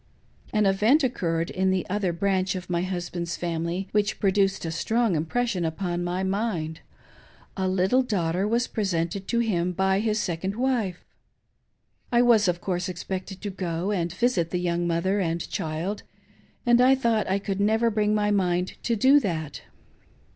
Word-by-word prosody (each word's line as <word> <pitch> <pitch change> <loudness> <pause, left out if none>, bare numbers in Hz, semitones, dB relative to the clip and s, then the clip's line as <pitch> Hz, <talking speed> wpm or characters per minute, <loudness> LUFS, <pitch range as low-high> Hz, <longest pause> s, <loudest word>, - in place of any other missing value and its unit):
An 215 -1 +2
event 215 +10 +4
occurred 170 -9 -1
in 190 0 +1
the 190 -1 0
other 195 -1 0
branch 190 +2 0
of 180 -1 -6
my 170 0 +1
husband's 175 -2 -3
family 170 +2 -2
which 210 0 0
produced 195 -2 +1
a 165 - -2
strong 220 +4 +1
im 155 +1 -1
pression 235 -3 0
upon 175 +2 -2
my 180 +2 -2
mind 190 -5 -2 0.4
— - - -27
a 190 -2 -1
little 190 +7 +2
daughter 190 -5 0
was 235 +3 +1
presented 190 -2 -2
to 235 - 0
him 180 -6 0
by 190 +1 +2
his 215 0 0
second 190 +1 -2
wife. 235 -8 -1 1.1
I 240 0 +4
was, 225 -4 +5
of 175 -1 0
course, 185 0 -2
expected 185 +2 -5
to 205 - -4
go 180 0 -2
and 175 -4 -1
visit 190 -4 +1
the 180 - -1
young 175 -1 -1
mother 180 +4 +1
and 170 -2 -1
child, 165 +6 -3 0.6
and 240 0 +5
I 260 +2 +6
thought 230 -6 0
I 190 - +2
could 200 -1 -3
never 220 +3 +2
bring 210 0 +1
my 210 0 +1
mind 180 -2 0
to 235 - 0
do 265 +6 +6
that. 160 - -3
190 Hz, 170 wpm, -25 LUFS, 175-210 Hz, 1.1 s, I